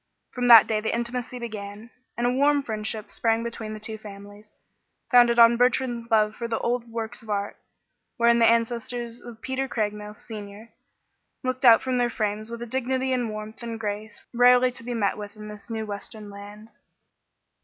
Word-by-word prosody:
From 245 -1 -1
that 230 -2 +10
day 215 -1 -1
the 220 - -1
intimacy 245 +1 -4
began, 215 -1 -7 0.3
and 240 - 0
a 245 - +3
warm 285 +2 +3
friendship 215 -2 -4
sprang 225 0 +1
up - - -5
between 225 -2 -6
the - - -8
two 220 0 -5
families, 205 0 -12 0.6
founded 240 -1 +6
on 235 0 +7
Bertrand's 245 -1 +1
love 215 -1 +3
for 235 - -4
the 225 -1 -1
old 235 0 -2
works 230 +1 -5
of 225 - -15
art, 205 -1 -2 0.6
wherein 235 -1 +4
the 230 - +6
ancestors 235 +1 -1
of 235 -2 -12
Peter 265 +1 -2
Craigmile, 210 -3 -3
Senior, 210 0 -10 0.7
looked 255 +1 -3
out 230 -2 +7
from 255 -1 0
their 240 0 +2
frames 215 -1 -3
with 235 0 -6
a - - -5
dignity 260 +2 -1
and 245 -3 -1
warmth 215 +1 -7
and 230 -1 -5
grace 210 0 -5
rarely 250 +1 +5
to 240 - -11
be 240 0 -4
met 210 -2 0
with 205 0 -8
in 210 0 -9
this 210 +1 -10
new 220 -1 -3
western 205 0 -8
land. 205 +2 -11
230 Hz, 185 wpm, -25 LUFS, 215-240 Hz, 0.7 s, that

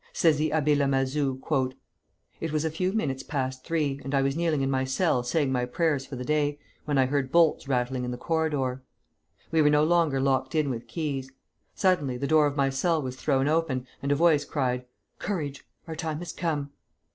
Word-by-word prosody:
Says 160 -3 +3
the 155 +1 +1
Abbé 150 -1 +2
Lamazou, 135 -1 +1 1.0
"It 165 - -3
was 155 +1 0
a 160 - 0
few 180 +4 -1
minutes 140 -11 -1
past 130 -2 -3
three, 150 -4 -1
and 135 +2 -2
I 135 - +3
was 135 0 0
kneeling 160 -4 +1
in 135 - 0
my 130 -1 +1
cell 130 +1 +1
saying 130 +3 0
my 125 -1 +1
prayers 140 +1 0
for 135 - -7
the 125 0 -5
day, 145 0 +1 0.3
when 145 -2 0
I 130 - +5
heard 130 0 -1
bolts 165 -4 +3
rattling 125 -1 0
in 125 - -3
the 125 - -4
corridor. 145 -4 -1 0.7
We 160 -1 +4
were 150 - +5
no 150 0 +4
longer 160 -4 +3
locked 130 +1 +1
in 150 -3 +2
with 115 -1 -5
keys. 140 -5 -3 0.5
Suddenly 150 -10 +1
the 140 - -2
door 155 0 +4
of 145 0 -4
my 135 -1 +2
cell 160 +5 +1
was 130 -3 -4
thrown 135 0 +1
open, 150 -5 0 0.2
and 140 - -1
a - - +4
voice 155 -1 +4
cried: 125 -4 -1 0.3
'Courage! 150 -9 -4 0.2
our 160 - -5
time 160 -2 -3
has 175 +2 -6
come.' 150 -5 -2
145 Hz, 205 wpm, -27 LUFS, 130-160 Hz, 1.0 s, I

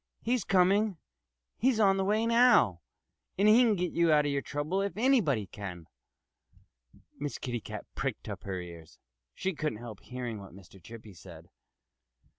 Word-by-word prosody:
"He's 240 -2 0
coming! 195 +1 +2 0.6
He's 245 -1 +2
on 195 -2 +4
the 195 - +1
way 215 +3 +1
now; 230 - +4 0.6
and 200 +2 +3
he 220 +3 +7
can 230 -4 +4
get 180 -2 -2
you 170 -1 +2
out 150 -1 +4
of 145 - 0
your 140 0 -1
trouble 145 - -2
if 200 -2 -3
anybody 215 - +2
can." 90 -4 -8 1.3
Miss 145 0 -4
Kitty 120 -3 -4
Cat - - -8
pricked - - -4
up - - -6
her 95 -2 -4
ears. 85 -3 -11 0.4
She 190 - -2
couldn't 150 -8 -3
help 115 -3 -9
hearing 120 -4 -6
what 95 -3 -12
Mr. 95 0 -16
Chippy 110 0 -12
said. 85 - -13
150 Hz, 165 wpm, -30 LUFS, -, 1.3 s, he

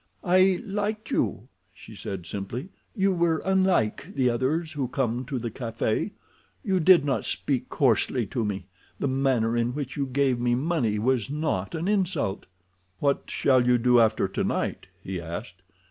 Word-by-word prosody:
"I 185 +1 +4
liked 210 +2 -3
you," 110 - -1 0.3
she 110 - -12
said 95 -3 -6
simply. 100 - -5 0.3
"You 195 -2 +2
were 170 -2 +2
unlike 190 - +1
the 125 -2 +3
others 155 +7 -1
who 140 -4 -2
come 125 -1 -1
to 135 +1 -3
the 120 -1 -4
café. 115 - -2 0.5
You 190 -5 +1
did 175 -2 +6
not 135 -2 0
speak 130 -3 -1
coarsely 125 -3 +2
to 115 +4 -2
me—the 95 +4 -5
manner 130 -4 +1
in 120 +2 0
which 140 -3 -4
you 140 -1 -1
gave 130 -1 +1
me 120 0 +2
money 130 -6 0
was 120 +1 +1
not 145 - -2
an 165 +3 -2
insult." 180 - 0 0.5
"What 140 +4 0
shall 130 -2 +3
you 125 0 +5
do 125 0 +4
after 110 -3 +3
tonight?" 95 - -2 0.2
he 95 -2 -4
asked. 90 +3 -7
130 Hz, 160 wpm, -26 LUFS, 115-160 Hz, 0.5 s, did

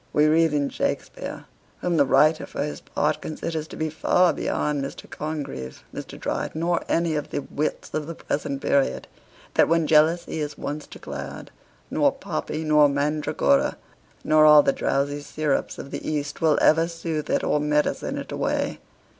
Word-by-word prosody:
We 150 - +4
read 160 +1 +4
in 145 -2 0
Shakspeare - - -3 0.4
(whom 175 -2 0
the 140 -2 +4
writer 155 +4 +4
for - - -3
his 150 - -5
part - - -1
considers 155 0 -4
to - - -10
be 155 -1 -2
far 180 +3 +3
beyond 145 -2 -1
Mr. 140 - -7
Congreve, 140 - -5
Mr. - - -8
Dryden, 160 - -3
or 175 0 +1
any 165 -1 +1
of 150 -1 -3
the 145 - -3
wits 150 +2 -3
of 155 -1 -2
the 165 - -6
present 140 -2 -3
period,) 140 -1 +1 0.5
that - - +4
when 165 0 +2
jealousy 160 +2 +3
is 150 -1 -4
once 150 +1 -5
declared, - - -8 0.4
nor - - +3
poppy, 160 - -4
nor 150 -1 +5
mandragora, 145 - +1 0.5
nor 155 0 +5
all 150 -1 +8
the 135 - +2
drowsy 145 +1 -1
syrups 150 0 -1
of 140 - -8
the - - -5
East, 145 -1 -3
will 160 -2 +4
ever 165 +1 +4
soothe 165 -2 -4
it - - +1
or 150 - +2
medicine 150 0 0
it - - -6
away. - - -1
150 Hz, 170 wpm, -24 LUFS, 145-160 Hz, 0.5 s, all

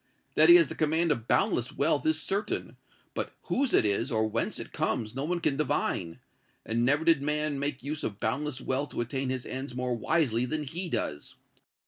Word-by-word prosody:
That - - +6
he 345 - +11
has 340 -1 +6
the - - -6
command 160 +2 +2
of 120 -5 -2
boundless 120 0 +1
wealth 150 +1 +1
is 155 0 +2
certain; 200 +6 -2 0.4
but - - -3
whose 270 -1 0
it - - +4
is, 110 +6 0
or 110 -1 +2
whence 115 +1 -2
it - - -8
comes, 110 -2 -1
no 135 - -2
one 175 +2 -1
can 155 -5 0
divine; 130 - -1 0.5
and 115 +1 0
never 145 +5 +2
did 165 -4 +5
man 150 0 -1
make 140 -2 -3
use 150 +2 -3
of 100 -1 -4
boundless 130 +4 -2
wealth 135 +2 -2
to - - -1
attain 130 +3 -2
his 130 -1 -3
ends 130 -1 -5
more 125 0 -1
wisely 120 0 +1
than 155 +4 -2
he 170 +5 -4
does! 80 - -3
140 Hz, 200 wpm, -29 LUFS, 120-155 Hz, 0.5 s, he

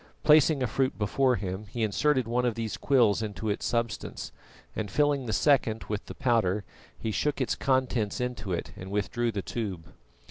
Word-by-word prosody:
Placing 150 -2 +5
a - - +3
fruit 130 +3 0
before 125 +5 +2
him, 95 0 -4
he 115 +2 -3
inserted 130 +4 +2
one 120 +2 +1
of 120 -3 +1
these 115 -2 -3
quills 120 -7 +3
into 110 0 -3
its 100 - -2
substance, 115 -1 -2 0.4
and 105 -2 -3
filling 145 +2 +1
the - - -1
second 115 -2 +2
with 105 -1 -3
the - - -8
powder, 110 -6 +1 0.3
he 110 - -3
shook 145 +7 0
its 130 - +1
contents 130 -5 0
into 125 -5 -3
it 85 - -3
and 95 0 -8
withdrew 110 +4 -1
the 100 -3 -3
tube. 95 -9 -5
115 Hz, 180 wpm, -28 LUFS, 105-130 Hz, 0.4 s, Placing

